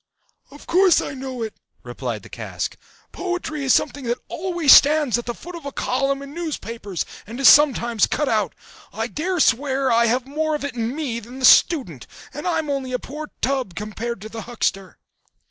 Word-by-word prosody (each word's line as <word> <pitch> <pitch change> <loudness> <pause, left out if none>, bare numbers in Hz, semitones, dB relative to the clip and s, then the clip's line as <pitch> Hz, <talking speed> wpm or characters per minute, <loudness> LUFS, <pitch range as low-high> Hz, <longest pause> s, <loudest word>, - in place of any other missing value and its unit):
"Of 290 +1 -14
course 370 0 +4
I - - -4
know 260 -3 -5
it," 220 - -5 0.3
replied - - -5
the - - -13
cask: - - -5 0.4
"poetry 345 -5 -4
is 265 - +3
something 285 -2 -1
that 240 +1 -1
always 345 -5 +1
stands 295 -5 +6
at 240 - -8
the 240 - -2
foot 355 - -10
of 340 - -8
a 280 - -5
column 275 +2 -1
in 280 - -9
the 290 - -12
newspapers, 230 - -4 0.2
and 235 +4 -8
is 275 - +5
sometimes 240 -7 +5
cut 295 - -1
out. 215 -8 0 0.4
I 220 +2 -3
dare 330 - -2
swear 265 0 +2
I 235 0 +4
have 245 +2 0
more 310 +3 -1
of 295 - -4
it 285 - -4
in 235 +1 -3
me 270 -7 -3
than 240 +3 -11
the 260 - +1
student, 250 - +4 0.3
and 295 +6 -5
I'm 325 -3 0
only 270 -3 -3
a - - +2
poor 300 +4 -8
tub 255 -8 -1
compared 215 +2 -5
to 215 - -8
the 225 0 -7
huckster." 195 -5 -3
265 Hz, 195 wpm, -22 LUFS, 235-300 Hz, 0.4 s, stands